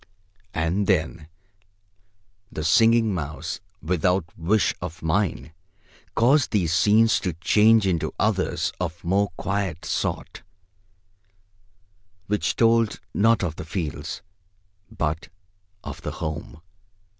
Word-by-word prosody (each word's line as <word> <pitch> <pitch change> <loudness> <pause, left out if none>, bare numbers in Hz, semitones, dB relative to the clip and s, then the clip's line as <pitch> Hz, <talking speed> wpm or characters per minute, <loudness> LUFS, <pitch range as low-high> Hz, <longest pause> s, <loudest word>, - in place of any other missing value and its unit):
And 85 +5 0
then 80 -4 0 1.2
the 80 - -4
Singing 115 +6 +4
Mouse, 75 -2 -4 0.2
without 90 +2 +1
wish 95 +5 +1
of 80 +1 -7
mine, 80 -1 -1 0.6
caused 135 +6 +4
these 90 -7 +1
scenes 110 +5 +4
to 90 -4 -2
change 105 +6 +4
into 90 -4 0
others - - 0
of 85 -1 -4
more 100 +3 +1
quiet 95 -5 -2
sort, - - -3 1.8
which 105 +2 0
told 115 -1 +3
not 115 0 +3
of 80 -3 -3
the - - -5
fields, 80 -3 -5 0.7
but 80 -7 -3 0.5
of - - -7
the - - -5
home. 80 0 -6
90 Hz, 105 wpm, -24 LUFS, 80-105 Hz, 1.8 s, Singing